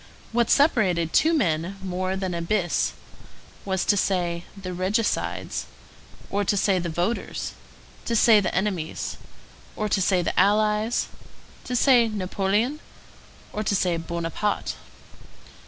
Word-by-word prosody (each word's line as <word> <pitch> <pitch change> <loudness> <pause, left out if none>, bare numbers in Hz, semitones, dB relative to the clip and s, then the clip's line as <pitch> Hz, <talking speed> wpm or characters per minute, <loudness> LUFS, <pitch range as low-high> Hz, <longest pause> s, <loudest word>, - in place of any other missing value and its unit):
What 235 0 +1
separated 190 - +3
two 320 - +4
men 185 - 0
more 185 0 -2
than 190 -2 -3
an 170 0 -3
abyss 180 -3 +1 0.7
was 190 -1 -1
to 205 - +4
say, 175 -3 0
the 185 -1 -5
regicides, 195 +5 -1 0.6
or 205 +1 +1
to 200 +1 +1
say 190 -1 +2
the 175 -1 -3
voters; 175 +8 -2 0.5
to 235 - 0
say 220 -1 +6
the 190 - -2
enemies, 185 -4 -2 0.6
or 215 - -1
to 195 - +1
say 185 -1 +2
the - - 0
allies; 210 +3 +2 0.6
to 250 - -3
say 245 -2 +5
Napoleon, 210 +6 -1 0.7
or 215 - -2
to 200 - +1
say 180 -2 +1
Buonaparte. 170 +5 -2
195 Hz, 130 wpm, -25 LUFS, 180-215 Hz, 0.7 s, say